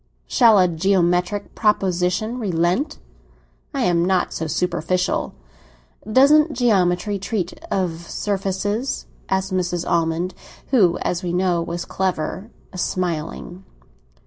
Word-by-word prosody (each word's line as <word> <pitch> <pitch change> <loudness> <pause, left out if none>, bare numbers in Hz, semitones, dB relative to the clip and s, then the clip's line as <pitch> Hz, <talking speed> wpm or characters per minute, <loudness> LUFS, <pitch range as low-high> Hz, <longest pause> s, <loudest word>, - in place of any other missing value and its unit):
"Shall 230 -4 +5
a 185 -1 +5
geometrical 180 +3 +1
proposition 195 +2 0
relent? 190 - 0 0.7
I 275 -3 -2
am 175 -7 +2
not 185 0 +1
so 160 - -3
superficial." 180 - -1 0.8
"Doesn't 295 +5 +5
geometry 200 -4 +1
treat 190 -3 -2 0.2
of 170 -3 -2
surfaces?" 205 +5 -2 0.2
asked 190 0 0
Mrs. 175 -2 -1
Almond, 170 +2 0 0.4
who, 190 -10 +4
as 175 0 -1
we 175 -2 -3
know, 180 -1 +1
was 170 +1 -4
clever, 190 +2 -2 0.2
smiling. 180 0 -3
185 Hz, 105 wpm, -21 LUFS, 175-205 Hz, 0.8 s, Shall